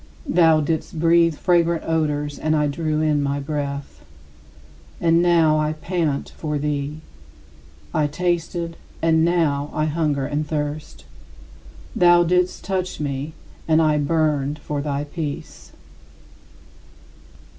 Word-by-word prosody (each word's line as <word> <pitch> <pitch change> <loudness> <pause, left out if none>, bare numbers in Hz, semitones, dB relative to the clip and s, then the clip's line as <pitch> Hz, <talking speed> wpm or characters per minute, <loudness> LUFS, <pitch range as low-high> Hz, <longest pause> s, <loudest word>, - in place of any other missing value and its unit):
Thou 165 -2 +4
didst 160 +1 -2
breathe 165 0 +4
fragrant 170 0 +2
odors 150 -2 -1
and 155 0 +1
I 150 -1 +2
drew 155 +1 -1
in 150 -2 +2
my 140 0 -1
breath; 140 - -5 1.0
and 165 0 +3
now 165 -3 +4
I 155 0 0
pant 155 -3 -2
for 150 -2 -3
thee. 145 +1 -3 0.9
I 150 - +2
tasted, 170 +1 -2 0.3
and 160 -1 +4
now 155 -4 +1
I 155 - 0
hunger 150 -3 0
and 150 +2 -2
thirst. 150 - -4 0.9
Thou 175 0 +6
didst 180 +1 +1
touch 185 -1 -3
me, 145 +1 -3 0.3
and 160 0 +4
I 155 -2 +3
burned 150 -1 0
for 150 -1 -4
thy 145 -1 -2
peace. 145 -1 -6
155 Hz, 120 wpm, -22 LUFS, 145-165 Hz, 1.0 s, Thou